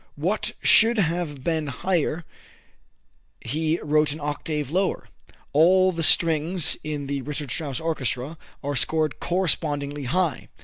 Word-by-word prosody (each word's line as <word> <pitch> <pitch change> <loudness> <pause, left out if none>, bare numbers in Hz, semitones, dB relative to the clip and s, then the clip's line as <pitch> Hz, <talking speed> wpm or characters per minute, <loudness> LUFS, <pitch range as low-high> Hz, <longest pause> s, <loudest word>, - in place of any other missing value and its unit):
What 180 +9 -2
should 230 +2 +5
have 165 -7 -2
been 160 -2 -1
higher 165 +3 -2 1.1
he 160 +2 -2
wrote 150 0 +2
an 155 - -9
octave 150 -1 -4
lower. 190 +2 -1 0.4
All 185 +5 +4
the 165 -2 -4
strings 165 +1 +4
in 150 -2 -4
the 140 0 -3
Richard 145 -1 -5
Strauss 140 +1 -2
orchestra 155 -2 -3 0.2
are 145 +1 -3
scored 155 +3 +2
correspondingly 145 -5 -1
high. 165 +1 -1
155 Hz, 125 wpm, -24 LUFS, 145-170 Hz, 1.1 s, should